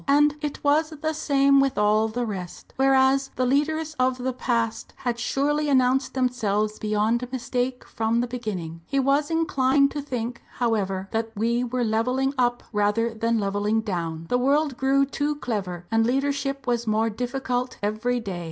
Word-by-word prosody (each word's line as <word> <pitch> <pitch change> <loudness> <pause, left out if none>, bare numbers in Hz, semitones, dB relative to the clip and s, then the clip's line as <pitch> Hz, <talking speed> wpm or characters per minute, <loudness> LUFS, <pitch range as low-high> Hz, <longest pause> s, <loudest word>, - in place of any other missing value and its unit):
And 295 +1 +4
it 295 -2 -4
was 300 +2 +3
the 315 0 -3
same 280 -2 +3
with 275 -5 +1
all 210 +1 +3
the 240 +2 -2
rest. 185 -5 -7
Whereas 270 0 +3
the 255 - +1
leaders 310 +4 0
of 255 0 +2
the 255 +1 -2
past 235 -2 -2
had 240 -2 -2
surely 295 +4 0
announced 260 0 +2
themselves 215 -5 0
beyond 220 +4 0
mistake 250 0 -2
from 225 +1 -1
the 240 - +1
beginning. 200 -10 -5
He 275 - 0
was 275 +2 +2
inclined 280 -4 +2
to 295 - -3
think, 245 -4 -4
however, 195 -5 -1
that 225 0 -1
we 235 +3 +1
were 250 0 -1
levelling 250 +5 +1
up 245 -2 +1
rather 210 +3 +1
than 230 +1 0
levelling 205 +2 0
down. 165 -6 -3
The 245 - +1
world 280 +2 +2
grew 270 +2 +2
too 290 +2 -2
clever, 195 - -4
and 225 0 +3
leadership 275 +2 -1
was 240 -2 -1
more 220 +1 +1
difficult 250 +2 -3
every 220 +4 0
day. 195 -6 -5
245 Hz, 165 wpm, -25 LUFS, 220-275 Hz, -, And